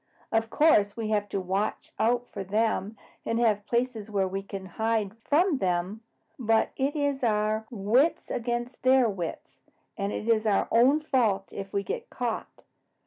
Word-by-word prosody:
"Of 225 0 +1
course, 215 -10 +3
we 220 -2 -3
have 205 -1 0
to 195 - -2
watch 190 +3 -2
out 240 +2 +2
for 195 - -5
them 210 +1 0 0.3
and 230 - -1
have 215 -3 +1
places 235 -3 -1
where 195 -2 +1
we 195 +1 -3
can 195 -1 -7
hide 220 +2 -1
from 300 +5 +2
them, 185 +3 -1 0.4
but 225 -2 +2
it 275 +2 -1
is 285 -3 -1
our 215 -1 +1
wits 240 +8 +1
against 240 +1 -3
their 260 -1 +5
wits, 185 -6 -5 0.4
and 200 -1 -2
it 215 - -4
is 225 -1 +2
our 205 - +2
own 265 +6 +5
fault 220 -10 0
if 195 0 -6
we 200 - -1
get 475 - -5
caught. - - -4
220 Hz, 165 wpm, -27 LUFS, 200-245 Hz, 0.4 s, their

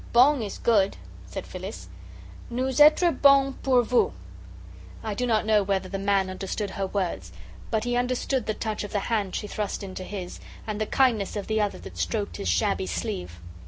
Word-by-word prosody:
"Bong 260 +3 +6
is 205 -3 -4
'good,'" 205 -4 +2 0.3
said - - -6
Phyllis. - - -7 0.6
"Nous 255 +2 -1
etre 310 +4 +7
bong 275 -2 +5
pour 255 -2 +4
vous." 245 +1 +2 0.9
I 215 - -2
do 250 +4 -1
not 220 -2 +2
know 215 -1 +4
whether 195 -1 -1
the 195 +1 -4
man 195 -1 +2
understood 195 +2 -4
her 195 0 -2
words, 190 -2 -3 0.4
but 220 -2 0
he 245 0 -1
understood 250 0 0
the 215 - 0
touch 215 -1 -3
of 205 - -7
the 205 +3 -2
hand 200 -4 0
she - - -3
thrust 205 -1 -3
into 185 -1 -6
his, 185 -2 -6 0.3
and 215 -1 -4
the 215 - 0
kindness 230 -8 +2
of 205 - -3
the 220 0 0
other 205 -1 0
hand - - -14
that - - -9
stroked 210 -3 -2
his 95 - -2
shabby 90 +2 +1
sleeve. 85 0 -4
210 Hz, 195 wpm, -26 LUFS, 195-245 Hz, 0.9 s, etre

